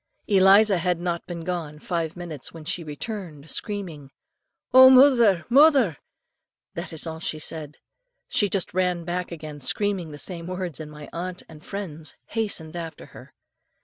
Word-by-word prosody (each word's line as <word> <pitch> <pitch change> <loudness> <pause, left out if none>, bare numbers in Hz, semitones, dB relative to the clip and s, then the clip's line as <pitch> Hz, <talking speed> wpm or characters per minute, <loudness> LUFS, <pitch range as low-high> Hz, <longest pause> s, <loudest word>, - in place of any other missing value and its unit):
"Eliza 195 0 +5
had 175 0 0
not 175 -1 -3
been 170 -2 -6
gone 165 -4 -4
five 165 +1 -3
minutes, 165 -6 -7
when 160 -2 -11
she 175 +1 -2
returned 155 -1 -7
screaming, 180 -10 -4 0.6
'Oh, 260 0 +10
murther! 250 -9 +6
murther!' 265 - +5 0.8
that - - -6
is 160 0 -2
all 160 -1 -6
she 160 - -3
said. 155 -1 -4 0.5
She 205 - +1
just 195 -2 -1
ran 180 -2 0
back 175 +1 -3
again, 155 -3 -8
screaming 190 +4 -1
the 145 - -9
same 170 +1 -4
words, 180 -4 -4
and 155 -1 -7
my 150 -1 -10
aunt 180 +1 -5
and 155 -2 -14
friends 165 -6 -7
hastened 190 -8 -1
after 165 -2 -7
her. - - -14
175 Hz, 155 wpm, -24 LUFS, 160-195 Hz, 0.8 s, Oh